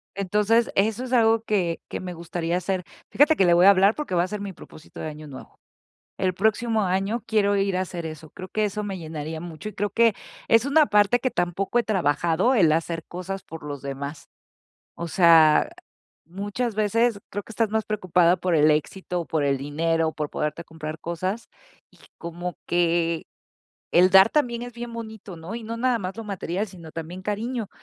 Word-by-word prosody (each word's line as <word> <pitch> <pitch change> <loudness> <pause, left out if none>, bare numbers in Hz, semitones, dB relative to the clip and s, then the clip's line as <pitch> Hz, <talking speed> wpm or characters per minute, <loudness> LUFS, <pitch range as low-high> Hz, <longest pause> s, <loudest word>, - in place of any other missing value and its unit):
Entonces, 210 +4 +2
eso 215 +4 +1
es 255 0 -5
algo 225 -2 +4
que 180 -7 0
que - - -4
me 180 -1 -6
gustaría 170 0 -3
hacer. 185 0 -2 0.3
Fíjate 300 +3 +4
que 195 - +3
le 175 - +5
voy 175 +2 +5
a - - +10
hablar 200 +2 +5
porque 300 -11 -3
va 170 - +3
a - - -2
ser 210 +1 -5
mi 200 -1 -5
propósito 155 -1 -14
de - - -4
año 155 0 -8
nuevo. 135 -2 -12 0.6
El 185 -1 0
próximo 220 +3 +1
año 195 +5 -1
quiero 205 -3 +2
ir 195 -1 +1
a 185 - +1
hacer 175 -2 -5
eso. 155 -1 -8
Creo 185 0 -9
que 215 +2 0
eso 210 +1 -3
me 195 -2 -4
llenaría 160 -1 -6
mucho 170 +4 -7
y - - -13
creo 205 +1 -2
que 230 +2 +3 0.4
es 230 +2 +5
una 300 +2 +5
parte 210 +3 +3
que 255 +1 -1
tampoco 180 +6 0
he - - +1
trabajado, 180 - +1
el 175 -9 +5
hacer 165 +1 -1
cosas 185 +2 -6
por 160 - -10
los 145 -2 -6
demás. 140 +2 -6 0.7
O 170 - -5
sea, 165 -3 +5 0.6
muchas 205 +6 -3
veces 215 +1 +1
creo 205 0 -4
que - - -12
estás 225 -1 0
más 220 0 +1
preocupada 180 -4 +2
por 180 +1 -1
el 155 0 +5
éxito, 175 +3 -1
por 155 -2 -1
el 140 -1 +1
dinero, 160 +3 0
por 150 -2 -3
poderte 150 +2 -3
comprar 155 -1 -7
cosas, 185 +7 -4 0.4
y - - -24 0.2
como 175 +1 -5
que 170 -1 +1 0.7
el 180 +2 +6
dar 190 +2 +8
también 240 -5 0
es 245 - -7
bien 240 0 -7
bonito, 220 -5 -8
¿no? 165 +6 -8
Y 235 - -7
no 230 +1 -5
nada 245 0 +1
más 190 -1 -5
lo 225 - -5
material, 195 0 -3
sino 170 -4 -12
también 165 +3 -7
cariño. 215 +2 -3
185 Hz, 200 wpm, -24 LUFS, 165-215 Hz, 0.7 s, a